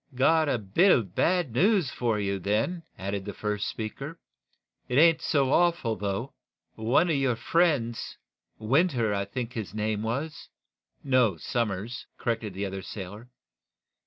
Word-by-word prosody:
"Got 155 +4 +3
a 130 - +2
bit 115 - +3
of 100 -8 +2
bad 175 - +1
news 185 - +3
for 115 -3 0
you, 100 -1 -1
then," 110 - 0 0.2
added 100 +1 -3
the 100 0 -7
first 105 -1 -2
speaker. 135 +9 -5 0.7
"It 125 - -1
ain't 165 +1 +6
so 135 -3 +1
awful 170 -10 +2
bad, 95 - -15
though. 100 +6 -2 0.4
One 120 +10 +2
of - - +2
your 135 -3 +1
friends 140 -6 0 0.4
Winter, 120 - +2
I 100 0 -1
think 120 +4 -5
his 105 -4 -5
name 105 0 -1
was 140 +8 -4 0.3
" - - -66 0.3
"No; 125 -9 +3
Somers," 115 +4 -3
corrected 115 -5 -2
the 100 +1 -2
other 95 0 -5
sailor. 100 +5 -8
115 Hz, 155 wpm, -27 LUFS, 105-140 Hz, 0.7 s, ain't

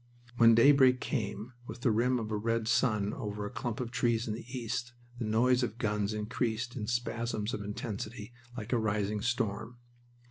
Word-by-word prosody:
When 115 -1 +7
daybreak 130 +1 +6
came, 115 -3 -3
with 115 +2 -8
the 120 - +3
rim 125 +4 +2
of 110 -2 -4
a - - 0
red 115 +1 0
sun 110 -3 +2
over 105 0 -4
a 105 - -5
clump 120 -1 -4
of 120 -2 -3
trees 120 -3 +1
in 110 - -1
the 115 +2 -7
east, 120 -1 -3 0.3
the 120 - -2
noise 125 +4 +3
of 120 -2 -2
guns 105 -2 0
increased 110 +2 -2
in 105 -4 -4
spasms 115 -2 -2
of - - -3
intensity 105 +2 -5 0.2
like 115 +1 -4
a 120 - +3
rising 105 -1 0
storm. 120 -1 -2
115 Hz, 180 wpm, -31 LUFS, 105-120 Hz, 0.3 s, When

